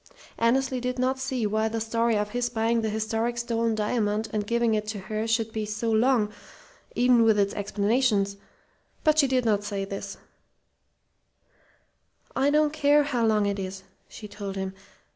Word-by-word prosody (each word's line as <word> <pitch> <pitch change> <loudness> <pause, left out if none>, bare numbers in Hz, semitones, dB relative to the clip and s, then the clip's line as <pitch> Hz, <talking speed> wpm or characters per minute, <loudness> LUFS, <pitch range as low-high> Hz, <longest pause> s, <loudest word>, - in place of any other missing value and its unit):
Annesley 255 +2 +1
did 250 +1 -2
not 260 +1 0
see 260 -3 -2
why 215 +1 +1
the 225 +1 -2
story 230 0 +1
of 210 0 -2
his 245 +1 -1
buying 230 0 +1
the 220 - -1
historic 225 +2 -1
stolen 230 -1 0
diamond 215 0 -1
and 210 -1 -2
giving 235 0 +1
it 215 0 -1
to 215 -1 -4
her 215 +3 -3
should 225 -1 0
be 220 - -2
so 215 +2 -3
very 220 - +3
long, 235 -5 +2 0.6
even 245 -1 +4
with 220 -2 +4
its 200 -1 +1
explanations; 205 0 0 0.7
but 310 0 +3
she 280 - +5
did 255 -2 +1
not 205 -2 +2
say 200 -1 -3
this. 195 0 -6 2.2
"I 270 +2 +2
don't 300 0 +2
care 295 -1 +4
how 255 -5 -1
long 215 -2 +2
it 200 0 -1
is," 190 0 -6 0.2
she 210 - -10
told 200 -1 -6
him. 190 -1 -4
225 Hz, 175 wpm, -26 LUFS, 210-245 Hz, 2.2 s, she